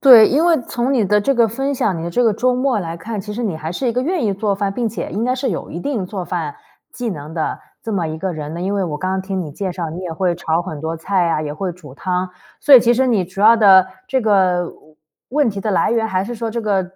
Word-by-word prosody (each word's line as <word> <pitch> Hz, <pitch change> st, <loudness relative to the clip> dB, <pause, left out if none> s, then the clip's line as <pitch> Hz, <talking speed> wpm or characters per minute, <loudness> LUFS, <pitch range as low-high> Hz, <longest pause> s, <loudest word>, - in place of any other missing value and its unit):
对， 240 Hz, -6 st, +9 dB
因 300 Hz, +5 st, +2 dB
为 335 Hz, -5 st, +4 dB
从 240 Hz, +3 st, -1 dB
你 235 Hz, -5 st, +2 dB
的 210 Hz, +2 st, +3 dB
这 275 Hz, +6 st, +1 dB
个 235 Hz, -2 st, +4 dB
分 270 Hz, +5 st, -2 dB
享 190 Hz, -8 st, 0 dB
你 -, -, -5 dB
的 170 Hz, -, -3 dB
这 245 Hz, -, +1 dB
个 225 Hz, -, +4 dB
周 250 Hz, +4 st, +1 dB
末 255 Hz, -2 st, +1 dB
来 170 Hz, -3 st, -4 dB
看， 210 Hz, +5 st, -5 dB
其 210 Hz, +2 st, -7 dB
实 235 Hz, +4 st, -4 dB
你 200 Hz, -8 st, -2 dB
还 160 Hz, +2 st, -5 dB
是 255 Hz, +7 st, -1 dB
一 -, -, 0 dB
个 250 Hz, +2 st, 0 dB
愿 330 Hz, -2 st, -1 dB
意 205 Hz, -, +1 dB
做 200 Hz, 0 st, 0 dB
饭， 195 Hz, 0 st, -1 dB
并 235 Hz, +1 st, -1 dB
且 220 Hz, -, -5 dB
应 220 Hz, +4 st, -2 dB
该 255 Hz, +1 st, +1 dB
是 260 Hz, +1 st, -1 dB
有 -, -, -4 dB
一 170 Hz, -, -5 dB
定 225 Hz, -5 st, -2 dB
做 185 Hz, -2 st, -5 dB
饭 165 Hz, -6 st, -3 dB, 0.4 s
技 245 Hz, -2 st, -4 dB
能 155 Hz, -1 st, -7 dB
的 160 Hz, -, -2 dB, 0.2 s
这 225 Hz, -, -4 dB
么 180 Hz, -5 st, 0 dB
一 155 Hz, 0 st, -4 dB
个 190 Hz, +1 st, -2 dB
人 155 Hz, -1 st, -6 dB
呢。 170 Hz, -, -5 dB
因 195 Hz, +2 st, -1 dB
为 195 Hz, -2 st, 0 dB
我 150 Hz, -3 st, -3 dB
刚 185 Hz, 0 st, -2 dB
刚 190 Hz, -, -1 dB
听 190 Hz, 0 st, -3 dB
你 160 Hz, -4 st, -5 dB
介 185 Hz, +5 st, -4 dB
绍， 170 Hz, -3 st, -4 dB
你 170 Hz, +3 st, -6 dB
也 180 Hz, -3 st, -5 dB
会 175 Hz, +1 st, 0 dB
炒 165 Hz, 0 st, -1 dB
很 155 Hz, -5 st, -7 dB
多 160 Hz, +1 st, -3 dB
菜 180 Hz, +1 st, 0 dB
啊， 160 Hz, -2 st, 0 dB
也 150 Hz, -1 st, -4 dB
会 180 Hz, +4 st, -3 dB
煮 150 Hz, -7 st, -13 dB
汤。 180 Hz, +3 st, -2 dB, 0.3 s
所 285 Hz, -, +7 dB
以 250 Hz, -, +10 dB
其 240 Hz, +1 st, +3 dB
实 260 Hz, +2 st, +2 dB
你 215 Hz, -7 st, +2 dB
主 190 Hz, +3 st, -8 dB
要 225 Hz, +3 st, +7 dB
的 190 Hz, -4 st, +7 dB, 0.2 s
这 260 Hz, 0 st, 0 dB
个 190 Hz, -5 st, +2 dB
问 -, -, -13 dB, 0.6 s
问 285 Hz, -2 st, +2 dB
题 195 Hz, -1 st, -5 dB
的 215 Hz, -, -2 dB
来 195 Hz, -, +2 dB
源， 225 Hz, -1 st, +1 dB
还 190 Hz, -3 st, 0 dB
是 240 Hz, +4 st, -5 dB
说 225 Hz, 0 st, -3 dB
这 235 Hz, +1 st, -3 dB
个 200 Hz, -3 st, +1 dB
195 Hz, 320 characters per minute, -19 LUFS, 175-235 Hz, 0.6 s, 以